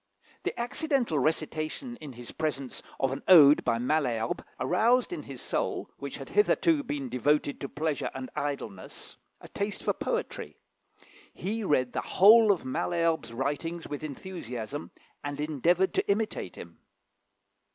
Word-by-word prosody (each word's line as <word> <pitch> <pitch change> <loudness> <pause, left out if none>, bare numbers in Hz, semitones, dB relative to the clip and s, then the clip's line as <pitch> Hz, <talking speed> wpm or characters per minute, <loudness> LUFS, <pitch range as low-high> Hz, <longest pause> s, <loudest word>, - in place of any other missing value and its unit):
The - - -4
accidental 245 - 0
recitation 155 - -1
in 150 - -9
his 120 0 -9
presence 140 -5 -3 0.2
of 135 - +1
an 135 - -4
ode 150 -5 +8
by 115 - +1
Malherbe 120 -3 0 0.2
aroused 230 - +2
in - - -4
his - - -9
soul, - - -2
which - - -6
had - - -9
hitherto 335 -6 +3
been 145 - -4
devoted 145 +4 +1
to 140 - -4
pleasure 155 -1 -2
and 130 -1 -6
idleness, 135 -10 -5 0.2
a - - -11
taste 200 0 -4
for - - +1
poetry. 475 0 -3 0.7
He 220 +4 -3
read 130 -8 +1
the - - -1
whole 215 +2 +7
of 190 - -1
Malherbe's 165 +2 0
writings 145 +7 -3
with 145 0 -6
enthusiasm, 140 - -6 0.3
and 145 0 -4
endeavoured 160 +5 +2
to - - 0
imitate 200 - -1
him. 85 -1 -11
155 Hz, 140 wpm, -29 LUFS, 135-195 Hz, 0.7 s, ode